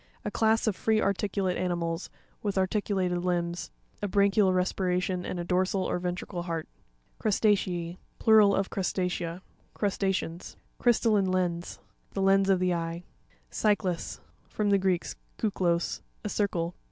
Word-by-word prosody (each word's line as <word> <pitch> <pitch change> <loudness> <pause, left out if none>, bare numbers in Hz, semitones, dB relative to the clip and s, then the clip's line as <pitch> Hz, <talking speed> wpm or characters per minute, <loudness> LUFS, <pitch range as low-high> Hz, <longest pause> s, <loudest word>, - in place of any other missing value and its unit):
A 210 - -2
class 220 +1 +2
of 215 -4 +1
free 220 +2 +2
articulate 195 -2 0
animals, 175 -1 -2 0.3
with 205 -2 -2
arti 190 +3 +2
culated 185 -4 -1
limbs, 175 -1 -1 0.3
a 205 - 0
branchial 200 0 +3
respi 185 +1 0
ration 180 0 -1
and 175 - -4
a - - -2
dorsal 185 +2 +1
or - - -1
ventrical 175 0 -4
heart. 165 -2 -3 0.5
Crusta'ce&.— 185 -5 +1 0.2
Plural 215 -2 +6
of 195 0 -1
Crustacea. 180 -2 -2 0.3
Crusta'ceans. 190 -4 -1 0.2
Cry'sTALLINE 220 -4 +3
LENS.—The 180 +1 -3
lens 195 0 +4
of 190 -2 +4
the 180 0 +2
eye. 170 0 -3 0.5
Cy'cias.—From 205 +1 -1
the 200 - +5
Greek, 185 -2 +1 0.3
kuklos, 175 -5 0 0.2
a 210 - -2
circle. 180 -5 -1
185 Hz, 130 wpm, -28 LUFS, 175-200 Hz, 0.5 s, Plural